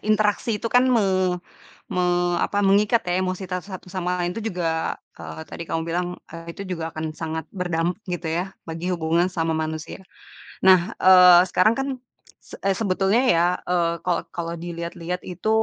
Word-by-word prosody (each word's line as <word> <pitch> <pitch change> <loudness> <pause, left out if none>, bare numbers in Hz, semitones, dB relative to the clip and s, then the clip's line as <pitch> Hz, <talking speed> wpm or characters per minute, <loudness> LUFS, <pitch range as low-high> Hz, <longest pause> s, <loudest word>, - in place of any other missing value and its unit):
interaksi 215 +1 +1
itu 220 - -4
kan 250 +1 +5
me 185 -4 +2 0.5
me 180 - -1 0.4
apa, 205 - 0
mengikat 210 +4 +4
ya, 175 - +1
emosi 185 +1 -3
ta 180 0 -3
satu 190 -2 -9
sama 180 -1 -2
lain 175 0 -1
itu 225 - -4
juga 165 -2 -2 0.2
eee, - - -8
tadi - - -7
kamu 165 0 -2
bilang, 175 +2 -1 0.2
eee, 165 0 -8
itu 195 +3 -8
juga 165 -2 -3
akan 155 0 -5
sangat 160 0 -4
berdampak 175 -1 -1 0.2
gitu 175 -1 -3
ya, 175 +4 -2 0.2
bagi 165 +3 -3
hubungan 170 +1 +1
sama 165 -2 -1
manusia. 160 +3 -4 0.6
Nah, 185 -2 +5
eee, 180 -1 +8
sekarang 200 +5 +4
kan, 270 +3 -2 0.5
se - - -19
e 195 - 0
sebetulnya 200 +2 +2
ya, 170 -8 +4 0.2
eee, 170 -1 +1
kalau 175 -2 +1
kalau 170 -1 -4
diliat-lihat 170 +1 -5
itu, 180 +4 -4
180 Hz, 170 wpm, -23 LUFS, 165-190 Hz, 0.6 s, eee